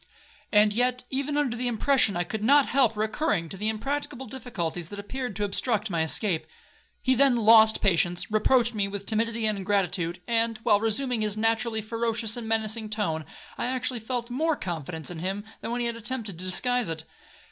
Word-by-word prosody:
And 210 Hz, 0 st, +5 dB
yet, 250 Hz, +2 st, +1 dB
even 280 Hz, +2 st, -1 dB
under 275 Hz, -5 st, +1 dB
the 245 Hz, +1 st, -2 dB
impression, 240 Hz, -3 st, +2 dB
I 175 Hz, -, +1 dB
could 210 Hz, +4 st, -5 dB
not 280 Hz, +4 st, +6 dB
help 245 Hz, -5 st, +2 dB
recurring 215 Hz, -, 0 dB
to -, -, -7 dB
the 210 Hz, +3 st, -1 dB
impracticable 265 Hz, +3 st, -3 dB
difficulties 180 Hz, -10 st, -5 dB
that 205 Hz, -, -8 dB
appeared 245 Hz, +2 st, -5 dB
to 210 Hz, -, -2 dB
obstruct 210 Hz, +1 st, -1 dB
my 165 Hz, -2 st, +1 dB
escape. 165 Hz, +2 st, 0 dB, 0.6 s
He 260 Hz, -, +3 dB
then 265 Hz, 0 st, +5 dB
lost 220 Hz, -1 st, +6 dB
patience,—reproached 210 Hz, +7 st, +2 dB
me 205 Hz, -2 st, 0 dB
with 200 Hz, 0 st, -6 dB
timidity 225 Hz, +1 st, 0 dB
and 215 Hz, -2 st, 0 dB
ingratitude; 180 Hz, -3 st, 0 dB
and, 230 Hz, -1 st, +1 dB
while 210 Hz, -3 st, +4 dB
resuming 225 Hz, +2 st, -1 dB
his 210 Hz, -1 st, -1 dB
naturally 225 Hz, 0 st, +1 dB
ferocious 225 Hz, 0 st, -1 dB
and 235 Hz, -2 st, -6 dB
menacing 220 Hz, 0 st, -1 dB
tone, 165 Hz, -8 st, -1 dB, 0.3 s
I -, -, 0 dB
actually 255 Hz, -1 st, -2 dB
felt 235 Hz, +1 st, -4 dB
more 315 Hz, +5 st, +1 dB
confidence 165 Hz, -, -5 dB
in 170 Hz, -, -6 dB
him 190 Hz, +4 st, -3 dB, 0.2 s
than -, -, -4 dB
when 240 Hz, +1 st, -1 dB
he -, -, 0 dB
had 235 Hz, -1 st, -1 dB
attempted 230 Hz, -6 st, -4 dB
to 185 Hz, -, -5 dB
disguise 245 Hz, +4 st, +1 dB
it. 160 Hz, -1 st, -4 dB
220 Hz, 185 wpm, -27 LUFS, 200-245 Hz, 0.6 s, not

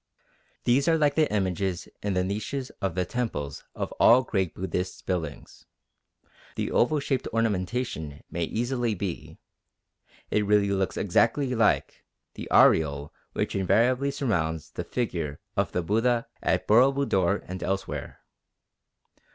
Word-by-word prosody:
These 130 Hz, +3 st, +3 dB
are 165 Hz, -1 st, +4 dB
like 150 Hz, -2 st, +3 dB
the 155 Hz, 0 st, +2 dB
images 95 Hz, -2 st, -1 dB
in 100 Hz, -2 st, -1 dB
the 90 Hz, -, +2 dB
niches 110 Hz, +8 st, -3 dB
of 95 Hz, -4 st, -1 dB
the 90 Hz, -1 st, 0 dB
temples 95 Hz, -12 st, -3 dB
of -, -, -3 dB
all 125 Hz, +2 st, +7 dB
great 95 Hz, -7 st, -1 dB
Buddhist 90 Hz, 0 st, -4 dB
buildings; 80 Hz, -6 st, -5 dB, 0.9 s
the -, -, -2 dB
oval 150 Hz, +5 st, +3 dB
shaped 140 Hz, -2 st, -1 dB
ornamentation 100 Hz, -, -2 dB
may 85 Hz, 0 st, -1 dB
easily 120 Hz, +2 st, -1 dB
be, 95 Hz, -2 st, -5 dB, 0.9 s
it 105 Hz, -, +2 dB
really 100 Hz, -1 st, +3 dB
looks 95 Hz, -1 st, -1 dB
exactly 120 Hz, +7 st, +2 dB
like, 115 Hz, -3 st, +1 dB, 0.3 s
the -, -, -7 dB
aureole 70 Hz, -2 st, +4 dB, 0.2 s
which -, -, -1 dB
invariably 125 Hz, +8 st, +2 dB
surrounds 80 Hz, -, -1 dB
the -, -, -4 dB
figure 85 Hz, -, -3 dB, 0.2 s
of -, -, 0 dB
the 90 Hz, -, -1 dB
Buddha 115 Hz, +6 st, +1 dB, 0.2 s
at -, -, +1 dB
Boro 125 Hz, +6 st, +6 dB
Budor 100 Hz, -9 st, +1 dB
and 90 Hz, 0 st, -6 dB
elsewhere. 95 Hz, +1 st, -4 dB
100 Hz, 135 wpm, -27 LUFS, 90-125 Hz, 0.9 s, all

